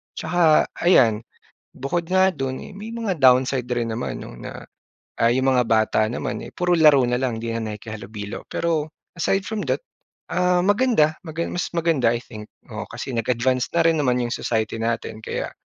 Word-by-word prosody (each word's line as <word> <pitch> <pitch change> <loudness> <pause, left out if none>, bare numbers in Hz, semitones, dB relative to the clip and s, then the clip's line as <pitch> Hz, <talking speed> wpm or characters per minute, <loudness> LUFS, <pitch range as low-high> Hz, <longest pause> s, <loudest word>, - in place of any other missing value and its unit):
Tsaka 165 -3 +3 0.2
ayan, 120 -12 +4 0.5
bukod 140 +6 -2
nga 190 0 +5
do'n 135 -1 -3
eh - - -11
may 215 +3 -8
mga 225 -5 -2
downside 130 -2 +4
rin 120 -1 0
naman 120 - -4
'no - - -9
na, - - -8 0.6
ah, 115 - +5
yung 130 +2 +2
mga 125 -2 +2
bata 110 -1 +2
naman 120 - -4
eh - - -8
puro 180 -1 -1
laro 150 -5 +6
na 125 +1 0
lang, 125 -4 -1
hindi 115 0 -4
na 110 -2 -3
nakikihalubilo. 105 -1 -8
Pero 160 -2 -1 0.3
aside 190 +3 0
from 220 -2 -3
that, - - +1 0.5
ah, 180 0 +2
maganda 205 -7 +3
magan 160 +1 -3
mas 180 - -2
maganda 160 -8 +2
i 120 - -3
think. 105 -2 -10 0.3
Oo, - - -5
kasi - - -6
nag-advance 125 +2 0
na 170 - +5
rin 165 -1 +3
naman 125 -3 +2
yung 120 - -2
society 110 -1 -2
natin. 115 -1 -2
Kaya, - - -4
130 Hz, 180 wpm, -23 LUFS, 115-170 Hz, 0.6 s, laro